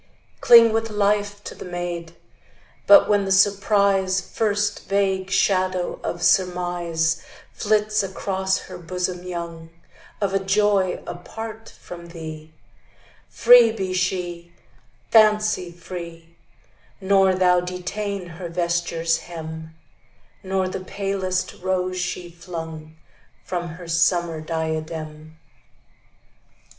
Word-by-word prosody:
Cling 230 Hz, -2 st, +7 dB
with 225 Hz, 0 st, 0 dB
life 205 Hz, 0 st, 0 dB
to -, -, -7 dB
the -, -, -10 dB
maid; 175 Hz, -1 st, -5 dB, 0.7 s
But 300 Hz, -1 st, +8 dB
when 205 Hz, -1 st, +3 dB
the 195 Hz, -, -3 dB
surprise, 200 Hz, -1 st, +3 dB
First 210 Hz, 0 st, -2 dB
vague 195 Hz, -1 st, 0 dB
shadow 185 Hz, -2 st, +1 dB
of -, -, -4 dB
surmise 175 Hz, -3 st, +1 dB, 0.3 s
Flits 215 Hz, 0 st, +1 dB
across 190 Hz, 0 st, -2 dB
her 185 Hz, -1 st, -10 dB
bosom 180 Hz, +1 st, -3 dB
young, 170 Hz, -2 st, -6 dB, 0.5 s
Of 200 Hz, -2 st, -1 dB
a 195 Hz, -, +2 dB
joy 195 Hz, -1 st, +1 dB
apart 220 Hz, +5 st, -8 dB
from 170 Hz, -1 st, -10 dB
thee, 160 Hz, -2 st, -9 dB, 0.8 s
Free 240 Hz, -1 st, +7 dB
be 190 Hz, -4 st, -3 dB
she, 175 Hz, -2 st, -2 dB, 0.6 s
fancy 215 Hz, -4 st, +4 dB
free; 170 Hz, -1 st, -9 dB, 0.6 s
Nor 195 Hz, -1 st, +3 dB
thou 180 Hz, -1 st, +4 dB
detain 180 Hz, +2 st, -4 dB
her 170 Hz, 0 st, -8 dB
vesture's 170 Hz, -1 st, 0 dB
hem, 160 Hz, -1 st, -8 dB, 0.7 s
Nor 190 Hz, 0 st, -1 dB
the 185 Hz, -, -4 dB
palest 190 Hz, -2 st, -2 dB
rose 185 Hz, 0 st, -1 dB
she 180 Hz, 0 st, -3 dB
flung 160 Hz, -2 st, -8 dB, 0.5 s
From 175 Hz, -1 st, -3 dB
her 170 Hz, +1 st, -9 dB
summer 165 Hz, -1 st, +1 dB
diadem. 155 Hz, -1 st, -5 dB
180 Hz, 105 wpm, -23 LUFS, 170-200 Hz, 0.8 s, But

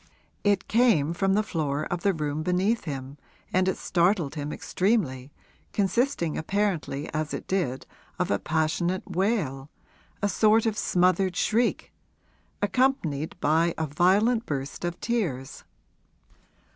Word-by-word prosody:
It 200 Hz, -2 st, +2 dB
came 215 Hz, -, +3 dB
from 195 Hz, +2 st, +1 dB
the 215 Hz, -, +2 dB
floor 150 Hz, -6 st, -2 dB
of 175 Hz, +1 st, -3 dB
the 200 Hz, -, +3 dB
room 150 Hz, -3 st, -2 dB
beneath 185 Hz, +7 st, +1 dB
him 135 Hz, -1 st, -6 dB, 0.3 s
and 185 Hz, 0 st, +3 dB
it 190 Hz, -, 0 dB
startled 175 Hz, -4 st, +1 dB
him 150 Hz, -1 st, -4 dB
extremely, 155 Hz, -, -1 dB, 0.4 s
consisting 200 Hz, -, 0 dB
apparently 175 Hz, -6 st, -1 dB
as 155 Hz, -1 st, -2 dB
it -, -, -7 dB
did 155 Hz, -9 st, -1 dB, 0.3 s
of -, -, -1 dB
a -, -, +1 dB
passionate 160 Hz, +3 st, 0 dB
wail 180 Hz, -, -1 dB, 0.5 s
a 205 Hz, -, +1 dB
sort 215 Hz, +2 st, +3 dB
of 220 Hz, -2 st, +1 dB
smothered 185 Hz, -1 st, +2 dB
shriek 230 Hz, +5 st, 0 dB, 0.7 s
accompanied 200 Hz, -, 0 dB
by 165 Hz, +3 st, +2 dB
a 160 Hz, -, 0 dB
violent 200 Hz, -, +2 dB
burst 140 Hz, +1 st, -4 dB
of 175 Hz, 0 st, -3 dB
tears. 165 Hz, -, -2 dB
175 Hz, 130 wpm, -26 LUFS, 150-205 Hz, 0.7 s, came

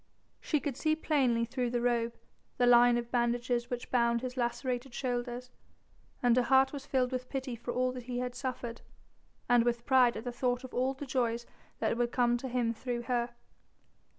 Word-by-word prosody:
She 305 Hz, -, 0 dB
could 285 Hz, -3 st, -3 dB
see 310 Hz, 0 st, +2 dB
plainly 260 Hz, -7 st, +1 dB
through 250 Hz, 0 st, -2 dB
the 240 Hz, 0 st, 0 dB
robe 235 Hz, -1 st, 0 dB, 0.4 s
the 245 Hz, -, +3 dB
line 245 Hz, 0 st, +6 dB
of 240 Hz, 0 st, -4 dB
bandages 240 Hz, 0 st, 0 dB
which 245 Hz, -1 st, -5 dB
bound 235 Hz, -1 st, +2 dB
his 255 Hz, 0 st, -5 dB
lacerated 245 Hz, +1 st, -2 dB
shoulders, 245 Hz, -1 st, -3 dB, 0.7 s
and 240 Hz, -1 st, +5 dB
her 250 Hz, -, +4 dB
heart 265 Hz, +2 st, +4 dB
was 280 Hz, -1 st, -7 dB
filled 255 Hz, -1 st, +1 dB
with 255 Hz, 0 st, -4 dB
pity 265 Hz, -2 st, -3 dB
for 240 Hz, +1 st, -5 dB
all 255 Hz, +1 st, +1 dB
that 250 Hz, -1 st, -8 dB
he 245 Hz, -1 st, -4 dB
had 250 Hz, 0 st, -2 dB
suffered, 245 Hz, -2 st, -5 dB, 0.7 s
and 245 Hz, -1 st, +5 dB
with 235 Hz, 0 st, -1 dB
pride 255 Hz, -3 st, +4 dB
at 220 Hz, -, -6 dB
thought 245 Hz, 0 st, -1 dB
of 260 Hz, -, -9 dB
all 260 Hz, +2 st, 0 dB
the 285 Hz, -, -6 dB
joys 240 Hz, -3 st, -1 dB, 0.3 s
that 220 Hz, 0 st, 0 dB
would 240 Hz, 0 st, 0 dB
come 240 Hz, -1 st, +3 dB
to 260 Hz, +2 st, -5 dB
him 240 Hz, -2 st, 0 dB
through 240 Hz, +1 st, -4 dB
her. 240 Hz, 0 st, -1 dB
245 Hz, 190 wpm, -31 LUFS, 240-255 Hz, 0.7 s, line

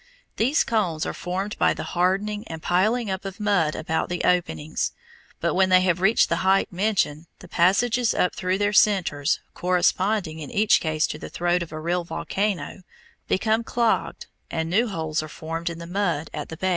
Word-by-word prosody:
These 260 Hz, +7 st, +3 dB
cones 180 Hz, -9 st, 0 dB
are -, -, -3 dB
formed 190 Hz, +4 st, -4 dB
by -, -, +3 dB
the -, -, -5 dB
hardening 195 Hz, +4 st, 0 dB
and 160 Hz, -, -6 dB
piling 215 Hz, +5 st, +1 dB
up 190 Hz, +1 st, -3 dB
of 195 Hz, 0 st, -7 dB
mud 200 Hz, -7 st, +1 dB
about 160 Hz, 0 st, -2 dB
the 175 Hz, -1 st, -2 dB
openings; 165 Hz, -3 st, 0 dB, 0.5 s
but -, -, 0 dB
when 190 Hz, 0 st, +3 dB
they 185 Hz, 0 st, +6 dB
have 180 Hz, -1 st, +1 dB
reached 215 Hz, +4 st, +4 dB
the 170 Hz, -, 0 dB
height 190 Hz, +2 st, +2 dB
mentioned, 175 Hz, -5 st, 0 dB
the 185 Hz, -, -13 dB
passages 220 Hz, +8 st, +2 dB
up 180 Hz, -, +1 dB
through 185 Hz, +1 st, -1 dB
their 205 Hz, +1 st, 0 dB
centres, 190 Hz, -10 st, +2 dB
corresponding 180 Hz, -1 st, +1 dB
in 150 Hz, -, -7 dB
each 210 Hz, +1 st, +3 dB
case 155 Hz, -1 st, 0 dB
to 150 Hz, -, -5 dB
the -, -, -8 dB
throat 175 Hz, +1 st, 0 dB
of 170 Hz, -, -6 dB
a 155 Hz, -, -5 dB
real 175 Hz, +2 st, -1 dB
volcano, 195 Hz, +2 st, -3 dB, 0.5 s
become 220 Hz, +4 st, +1 dB
clogged 235 Hz, 0 st, 0 dB, 0.2 s
and 160 Hz, 0 st, -3 dB
new 225 Hz, +6 st, +3 dB
holes 160 Hz, -6 st, -2 dB
are 155 Hz, -, -8 dB
formed 165 Hz, +2 st, -4 dB
in 170 Hz, -, -6 dB
the 170 Hz, -, -8 dB
mud 175 Hz, -4 st, -1 dB
at 150 Hz, -, -5 dB
the 160 Hz, -, -7 dB
base. 190 Hz, +3 st, 0 dB
180 Hz, 190 wpm, -24 LUFS, 165-205 Hz, 0.5 s, they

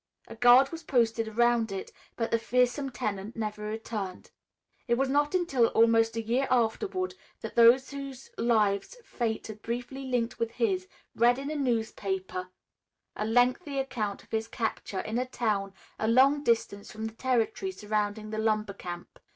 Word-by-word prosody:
A 230 Hz, -, -9 dB
guard 245 Hz, +3 st, +6 dB
was 330 Hz, 0 st, -6 dB
posted 230 Hz, -6 st, +1 dB
around 230 Hz, 0 st, +2 dB
it, 195 Hz, -1 st, -5 dB, 0.2 s
but 230 Hz, -1 st, -2 dB
the 230 Hz, -, +3 dB
fearsome 250 Hz, +4 st, +1 dB
tenant 210 Hz, -3 st, -4 dB
never 210 Hz, -1 st, -4 dB
returned. 210 Hz, -3 st, -5 dB, 0.6 s
It 235 Hz, -, +3 dB
was 270 Hz, +1 st, +1 dB
not 290 Hz, +4 st, +2 dB
until 275 Hz, -10 st, +3 dB
almost 225 Hz, 0 st, +3 dB
a 225 Hz, -, -1 dB
year 245 Hz, +5 st, +1 dB
afterward 370 Hz, -, 0 dB, 0.3 s
that -, -, -7 dB
those 240 Hz, +4 st, +6 dB
whose 275 Hz, -2 st, -8 dB
lives 215 Hz, -, +1 dB
fate 225 Hz, -3 st, -2 dB
had 215 Hz, -1 st, -8 dB
briefly 245 Hz, +4 st, -5 dB
linked 245 Hz, -2 st, -1 dB
with 230 Hz, 0 st, -1 dB
his, 190 Hz, -6 st, 0 dB, 0.3 s
read 240 Hz, +2 st, +4 dB
in 275 Hz, +2 st, -4 dB
a -, -, -3 dB
newspaper 200 Hz, -8 st, -2 dB, 0.7 s
a 210 Hz, -, -2 dB
lengthy 250 Hz, +6 st, +2 dB
account 245 Hz, -7 st, -2 dB
of -, -, -26 dB
his 225 Hz, 0 st, -1 dB
capture 220 Hz, -4 st, -3 dB
in 225 Hz, +3 st, -2 dB
a 250 Hz, -, 0 dB
town 210 Hz, -6 st, -1 dB, 0.3 s
a 220 Hz, -, 0 dB
long 270 Hz, +5 st, +5 dB
distance 225 Hz, -5 st, 0 dB
from 220 Hz, +1 st, -5 dB
the 220 Hz, -, -5 dB
territory 255 Hz, -, 0 dB
surrounding 210 Hz, -, -2 dB
the 215 Hz, -, -3 dB
lumber 215 Hz, -2 st, 0 dB
camp. 175 Hz, -2 st, -8 dB
230 Hz, 165 wpm, -29 LUFS, 215-255 Hz, 0.7 s, guard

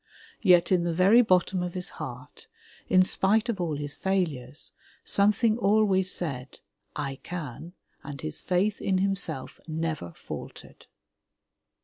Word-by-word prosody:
Yet 180 Hz, -4 st, +5 dB
in 180 Hz, -2 st, +3 dB
the 170 Hz, -1 st, -1 dB
very 195 Hz, +7 st, +6 dB
bottom 185 Hz, -3 st, +2 dB
of 180 Hz, 0 st, -4 dB
his 180 Hz, 0 st, -2 dB
heart, -, -, -8 dB, 0.4 s
in 185 Hz, 0 st, +6 dB
spite 215 Hz, +5 st, +1 dB
of 205 Hz, -6 st, -1 dB
all 160 Hz, -4 st, -1 dB
his 145 Hz, 0 st, -4 dB
failures, 155 Hz, -9 st, 0 dB, 0.3 s
some 200 Hz, +1 st, +4 dB
thing 220 Hz, +1 st, +1 dB
always 195 Hz, -3 st, +3 dB
said, 135 Hz, -6 st, -4 dB, 0.4 s
'*I 135 Hz, -1 st, -4 dB
can,'' 170 Hz, -1 st, -7 dB, 0.3 s
and 140 Hz, -1 st, -8 dB
his 75 Hz, -, -5 dB
faith 190 Hz, +3 st, 0 dB
in 190 Hz, -1 st, +1 dB
himself 195 Hz, -8 st, -2 dB
never 160 Hz, -, -3 dB
faltered. -, -, -10 dB
180 Hz, 135 wpm, -27 LUFS, 155-195 Hz, 0.4 s, very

